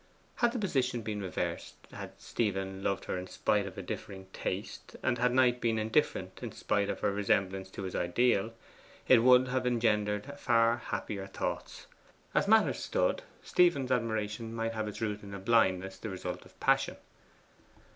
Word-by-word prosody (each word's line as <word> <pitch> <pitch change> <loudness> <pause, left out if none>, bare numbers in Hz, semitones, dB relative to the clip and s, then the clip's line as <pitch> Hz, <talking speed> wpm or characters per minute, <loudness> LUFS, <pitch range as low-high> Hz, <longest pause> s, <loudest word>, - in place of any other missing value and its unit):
Had 240 -1 +3
the 245 - -3
position 130 - 0
been 105 -1 -3
reversed 95 -3 -3 0.2
had - - -8
Stephen 95 -3 -2
loved 100 0 -1
her 90 - -2
in 90 - -7
spite 100 +1 0
of 95 - -9
a - - -5
differing 95 -1 -6
taste, 95 +4 -5
and 120 -2 +1
had 125 0 +3
Knight 125 -1 +3
been 115 -1 +1
indifferent 110 -4 0
in - - -5
spite 100 0 0
of - - -3
her - - +2
resemblance 95 -1 0
to 95 - -7
his 95 - -4
ideal, 105 +4 +2 0.6
it - - +7
would 125 +1 +6
have 130 0 0
engendered 110 +2 0
far 115 -1 +3
happier 100 -4 -4
thoughts. 95 - -4 0.5
As - - +2
matters 220 +1 +4
stood, - - 0 0.2
Stephen's 145 -8 +3
admiration 115 -1 -1
might 115 0 -1
have 110 -1 -2
its 105 - -6
root 105 -2 -2
in 100 -1 -8
a - - -6
blindness 95 -3 +2
the 110 - -5
result 90 -2 -5
of - - -24
passion. - - +2
110 Hz, 170 wpm, -31 LUFS, 100-125 Hz, 0.6 s, it